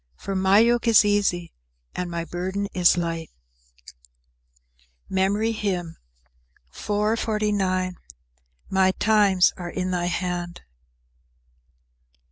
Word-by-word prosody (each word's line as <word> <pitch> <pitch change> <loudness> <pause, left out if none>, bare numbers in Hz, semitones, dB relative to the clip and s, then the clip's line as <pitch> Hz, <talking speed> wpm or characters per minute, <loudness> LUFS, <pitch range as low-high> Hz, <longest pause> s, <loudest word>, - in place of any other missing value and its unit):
For 195 - -5
my 190 +1 +3
yoke 235 +2 +3
is 220 -2 +6
easy 200 -4 0 0.4
and 180 -1 -4
my 170 -1 -4
burden 185 +4 -3
is 180 0 +4
light." 165 -2 -3 1.8
MEMORY 200 +4 +1
HYMN 180 -6 -3 0.7
_"My 190 - -2
times 205 -4 +3
are 175 -2 -6
in 185 +1 -3
thy 175 -1 -1
hand." 175 -1 -3
185 Hz, 90 wpm, -24 LUFS, 175-205 Hz, 1.8 s, is